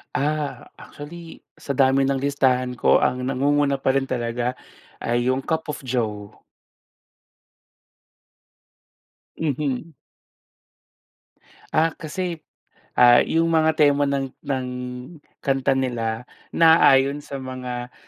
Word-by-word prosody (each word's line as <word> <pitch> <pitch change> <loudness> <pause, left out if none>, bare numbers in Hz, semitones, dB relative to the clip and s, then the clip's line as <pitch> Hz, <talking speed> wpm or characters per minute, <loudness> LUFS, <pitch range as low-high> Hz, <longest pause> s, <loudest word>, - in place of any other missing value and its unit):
A 150 0 -2
actually 165 +3 -11 0.2
sa - - -6
dami 135 0 +3
ng 135 0 0
listahan 130 -3 +1
ko - - +4
ang 125 0 0
nangunguna 140 +1 +1
pa 135 0 +1
rin 135 - +2
talaga 120 -1 -2 0.5
ay 120 +1 0
'yong 130 - 0
Cup 160 +3 -2
of 150 - -7
Joe. 110 -4 -3 3.0
Mhm. 150 0 -2 1.8
Ah, 160 +1 +2
kasi, 175 +2 -4 0.6
ah, 120 0 +7
'yong 165 +1 +1
mga 160 -1 +2
tema 145 -1 +3
ng 135 -2 -2
ng 130 -2 -3 0.7
kanta 135 -1 0
nila 120 -2 -2 0.2
naaayon 145 -4 +5
sa 140 -1 -7
mga 125 -2 -6
135 Hz, 105 wpm, -23 LUFS, 125-150 Hz, 3.0 s, ah